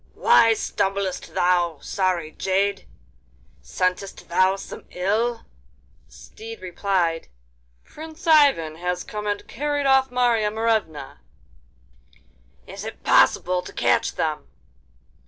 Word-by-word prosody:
'Why 230 Hz, -, +5 dB
stumblest 195 Hz, -3 st, -3 dB
thou, 175 Hz, -3 st, +1 dB
sorry 180 Hz, -4 st, -2 dB
jade? 195 Hz, +2 st, -1 dB, 0.7 s
Scentest 185 Hz, -, -3 dB
thou 185 Hz, +2 st, +3 dB
some 195 Hz, -, -10 dB
ill?' 220 Hz, +6 st, -1 dB, 0.6 s
The -, -, -30 dB
steed 225 Hz, +1 st, -11 dB
replied: 180 Hz, -2 st, -1 dB, 0.6 s
'Prince 320 Hz, +3 st, -11 dB
Ivan 280 Hz, -, +4 dB
has 180 Hz, +1 st, -3 dB
come 210 Hz, 0 st, -6 dB
and 205 Hz, 0 st, -3 dB
carried 290 Hz, +2 st, -2 dB
off 265 Hz, -1 st, +4 dB
Marya 240 Hz, -4 st, +1 dB
Morevna.' 220 Hz, -8 st, -2 dB, 1.5 s
'Is -, -, -9 dB
it -, -, -8 dB
possible 180 Hz, 0 st, +3 dB
to -, -, -10 dB
catch 120 Hz, 0 st, +1 dB
them? 155 Hz, -1 st, -2 dB
195 Hz, 105 wpm, -23 LUFS, 180-230 Hz, 1.5 s, Why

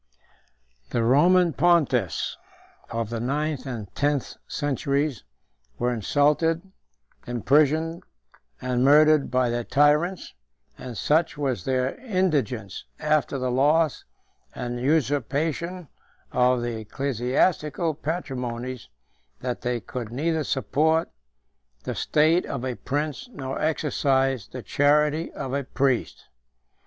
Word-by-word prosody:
The 120 Hz, -, 0 dB
Roman 170 Hz, +8 st, +4 dB
pontiffs, 135 Hz, -, +2 dB, 0.5 s
of 115 Hz, -1 st, -3 dB
the 115 Hz, -, -2 dB
ninth 145 Hz, +3 st, -2 dB
and 110 Hz, -7 st, -6 dB
tenth 145 Hz, -2 st, 0 dB
centuries, 140 Hz, -2 st, -1 dB, 0.5 s
were 125 Hz, +1 st, 0 dB
insulted, 150 Hz, -, +2 dB, 0.6 s
imprisoned, 150 Hz, +7 st, +2 dB, 0.6 s
and 125 Hz, 0 st, 0 dB
murdered, 150 Hz, +1 st, +5 dB
by 125 Hz, -1 st, +1 dB
their 120 Hz, 0 st, -1 dB
tyrants; 150 Hz, +8 st, +2 dB, 0.4 s
and 125 Hz, -3 st, -8 dB
such 155 Hz, 0 st, +1 dB
was 130 Hz, -10 st, -2 dB
their 130 Hz, 0 st, 0 dB
indigence, 155 Hz, -, -1 dB
after 150 Hz, -2 st, +1 dB
the 130 Hz, -1 st, -1 dB
loss 150 Hz, +4 st, +2 dB, 0.5 s
and 120 Hz, 0 st, -4 dB
usurpation 150 Hz, +5 st, 0 dB, 0.4 s
of 125 Hz, -1 st, +2 dB
the 120 Hz, -2 st, -3 dB
ecclesiastical 140 Hz, -, 0 dB
patrimonies, 130 Hz, -6 st, -4 dB, 0.5 s
that 125 Hz, -1 st, -3 dB
they 120 Hz, -1 st, -1 dB
could 115 Hz, -2 st, -6 dB
neither 155 Hz, +5 st, 0 dB
support 155 Hz, +4 st, +1 dB, 0.7 s
the -, -, -3 dB
state 160 Hz, +4 st, +2 dB
of 130 Hz, -2 st, -4 dB
a 130 Hz, -, -1 dB
prince, 150 Hz, -, -3 dB
nor 135 Hz, -, -5 dB
exercise 135 Hz, -6 st, +1 dB
the 125 Hz, -2 st, -8 dB
charity 150 Hz, +2 st, +2 dB
of 130 Hz, -, -5 dB
a 140 Hz, 0 st, 0 dB
priest. 135 Hz, -1 st, -1 dB
140 Hz, 105 wpm, -25 LUFS, 125-155 Hz, 0.7 s, murdered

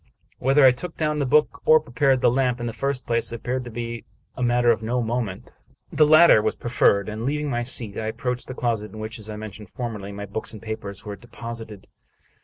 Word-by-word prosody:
Whether 135 Hz, +2 st, +4 dB
I 130 Hz, -, +9 dB
took 160 Hz, +7 st, -7 dB
down 150 Hz, -1 st, 0 dB
the 140 Hz, -, 0 dB
book, 150 Hz, +3 st, +2 dB
or 155 Hz, -, +6 dB
prepared 135 Hz, -2 st, +1 dB
the -, -, +4 dB
lamp 125 Hz, -1 st, +1 dB
in 120 Hz, -, -4 dB
the 115 Hz, -, -3 dB
first 140 Hz, 0 st, -2 dB
place, 115 Hz, -1 st, +1 dB
appeared 125 Hz, +2 st, -3 dB
to -, -, -7 dB
be 115 Hz, 0 st, -5 dB, 0.3 s
a -, -, -6 dB
matter 120 Hz, -1 st, +3 dB
of 110 Hz, -, 0 dB
no 120 Hz, +3 st, -1 dB
moment. 115 Hz, -4 st, -3 dB, 0.4 s
The 150 Hz, -, +5 dB
latter 155 Hz, -7 st, +7 dB
was -, -, 0 dB
preferred, 100 Hz, -4 st, +2 dB
and, 110 Hz, +1 st, -5 dB
leav 145 Hz, +5 st, -1 dB
ing 150 Hz, -2 st, -2 dB
my 120 Hz, -, 0 dB
seat, 115 Hz, -4 st, -1 dB
I 110 Hz, -, -3 dB
approached 125 Hz, +3 st, -3 dB
the 130 Hz, -, -6 dB
closet 115 Hz, -4 st, -1 dB
in -, -, -9 dB
which, 110 Hz, +1 st, -6 dB
as 110 Hz, 0 st, -8 dB
I 105 Hz, -, -5 dB
mentioned 105 Hz, -1 st, -9 dB
formerly, 105 Hz, -5 st, -5 dB
my 100 Hz, 0 st, -6 dB
books 100 Hz, +3 st, -6 dB
and 110 Hz, -, -8 dB
papers 100 Hz, -2 st, -7 dB
were 105 Hz, -1 st, -5 dB
deposited. 115 Hz, -3 st, -8 dB
120 Hz, 225 wpm, -24 LUFS, 110-130 Hz, 0.4 s, I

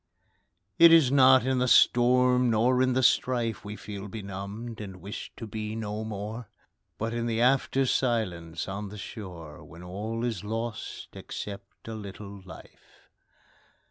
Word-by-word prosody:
It 170 Hz, 0 st, +9 dB
is 160 Hz, -6 st, +6 dB
not 130 Hz, -2 st, +6 dB
in 130 Hz, -1 st, +1 dB
the 125 Hz, -, +1 dB
storm 125 Hz, +1 st, +4 dB
nor 120 Hz, +3 st, +3 dB
in 130 Hz, 0 st, +2 dB
the 130 Hz, +1 st, +1 dB
strife 120 Hz, -3 st, +1 dB
We 105 Hz, +1 st, -6 dB
feel 100 Hz, -1 st, -7 dB
benumbed, 100 Hz, +3 st, -7 dB
and 95 Hz, -3 st, -7 dB
wish 100 Hz, +5 st, -7 dB
to 115 Hz, -, -6 dB
be 110 Hz, 0 st, -5 dB
no 110 Hz, -1 st, -4 dB
more, 110 Hz, +1 st, -6 dB, 0.5 s
But 115 Hz, +1 st, -3 dB
in 120 Hz, 0 st, -2 dB
the 115 Hz, -1 st, -1 dB
after 135 Hz, +2 st, +2 dB
silence 95 Hz, -11 st, -1 dB
on 100 Hz, +1 st, -5 dB
the 105 Hz, -, -9 dB
shore, 90 Hz, -7 st, -9 dB
When 85 Hz, 0 st, -13 dB
all 105 Hz, +6 st, -4 dB
is 110 Hz, -6 st, -3 dB
lost, 115 Hz, +1 st, -5 dB
except 100 Hz, 0 st, -8 dB
a 115 Hz, -, -5 dB
little 100 Hz, -1 st, -8 dB
life. 95 Hz, -, -16 dB
110 Hz, 150 wpm, -28 LUFS, 100-125 Hz, 0.5 s, It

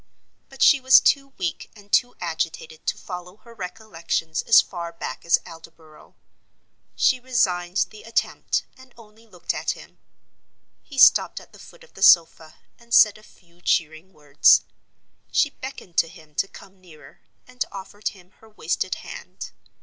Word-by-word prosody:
But 270 Hz, -2 st, -2 dB
she 285 Hz, -, +6 dB
was 260 Hz, 0 st, +7 dB
too 275 Hz, -1 st, +2 dB
weak 175 Hz, -4 st, -4 dB
and 205 Hz, -1 st, -18 dB
too 245 Hz, 0 st, +2 dB
agitated 160 Hz, -1 st, -5 dB
to -, -, 0 dB
follow 180 Hz, 0 st, -9 dB
her 235 Hz, -, -15 dB
recollections 180 Hz, -5 st, -4 dB
as 230 Hz, -, +6 dB
far 170 Hz, -2 st, -4 dB
back 165 Hz, -6 st, -7 dB
as 170 Hz, -, +4 dB
Aldborough. 160 Hz, -1 st, -16 dB, 0.8 s
She 255 Hz, -, +2 dB
resigned 185 Hz, -8 st, 0 dB
the 215 Hz, -, -13 dB
attempt, 230 Hz, 0 st, -2 dB
and 260 Hz, -1 st, -19 dB
only 225 Hz, 0 st, -18 dB
looked 180 Hz, -5 st, -4 dB
at -, -, -3 dB
him. -, -, -16 dB, 0.8 s
He 280 Hz, -, -13 dB
stopped -, -, +5 dB
at -, -, -18 dB
the -, -, -16 dB
foot -, -, -16 dB
of 480 Hz, -, -21 dB
the -, -, -13 dB
sofa 160 Hz, -2 st, +4 dB, 0.2 s
and 235 Hz, 0 st, -2 dB
said 210 Hz, 0 st, +6 dB
a -, -, -19 dB
few 175 Hz, -4 st, -24 dB
cheering 160 Hz, +2 st, -1 dB
words. 150 Hz, -3 st, +4 dB, 0.7 s
She 290 Hz, -, +2 dB
beckoned 260 Hz, -12 st, -10 dB
to -, -, +4 dB
him 160 Hz, -3 st, -17 dB
to 195 Hz, -, -1 dB
come 195 Hz, -1 st, -16 dB
nearer, 165 Hz, -4 st, -17 dB, 0.3 s
and 250 Hz, 0 st, -3 dB
offered 200 Hz, +2 st, -8 dB
him 185 Hz, -2 st, -8 dB
her 220 Hz, -, -19 dB
wasted 215 Hz, -, -3 dB
hand. -, -, -9 dB
190 Hz, 160 wpm, -23 LUFS, 165-230 Hz, 0.8 s, was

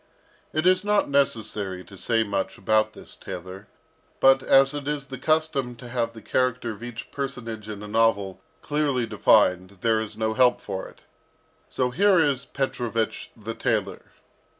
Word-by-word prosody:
It 155 Hz, +2 st, -1 dB
is 185 Hz, +1 st, +4 dB
not 205 Hz, -7 st, +1 dB
necessary 105 Hz, -8 st, 0 dB
to 100 Hz, -, -14 dB
say 115 Hz, +3 st, +1 dB
much 100 Hz, -2 st, -3 dB
about 110 Hz, +2 st, +2 dB
this -, -, -9 dB
tailor, 95 Hz, +3 st, -8 dB, 0.5 s
but 135 Hz, 0 st, +6 dB
as 135 Hz, +1 st, +5 dB
it 145 Hz, -1 st, -5 dB
is 145 Hz, -2 st, -2 dB
the 130 Hz, -2 st, -8 dB
custom 155 Hz, -5 st, 0 dB
to 120 Hz, +1 st, -11 dB
have 120 Hz, -1 st, -1 dB
the 110 Hz, -, -12 dB
character 125 Hz, -2 st, 0 dB
of 110 Hz, -, -10 dB
each 120 Hz, -1 st, -8 dB
personage 115 Hz, -6 st, -5 dB
in 105 Hz, -1 st, -6 dB
a -, -, -7 dB
novel 105 Hz, -3 st, +1 dB, 0.2 s
clearly 145 Hz, -5 st, 0 dB
defined 95 Hz, -3 st, +3 dB
there 115 Hz, -1 st, +2 dB
is 110 Hz, -1 st, -5 dB
no 110 Hz, 0 st, 0 dB
help 125 Hz, +1 st, +4 dB
for 95 Hz, -2 st, -5 dB
it, -, -, -18 dB, 0.7 s
so 125 Hz, -1 st, -1 dB
here 195 Hz, +6 st, +4 dB
is 140 Hz, -4 st, +1 dB
Petrovich 120 Hz, -4 st, -2 dB
the 110 Hz, +1 st, -6 dB
tailor. -, -, -1 dB
115 Hz, 165 wpm, -25 LUFS, 110-135 Hz, 0.7 s, but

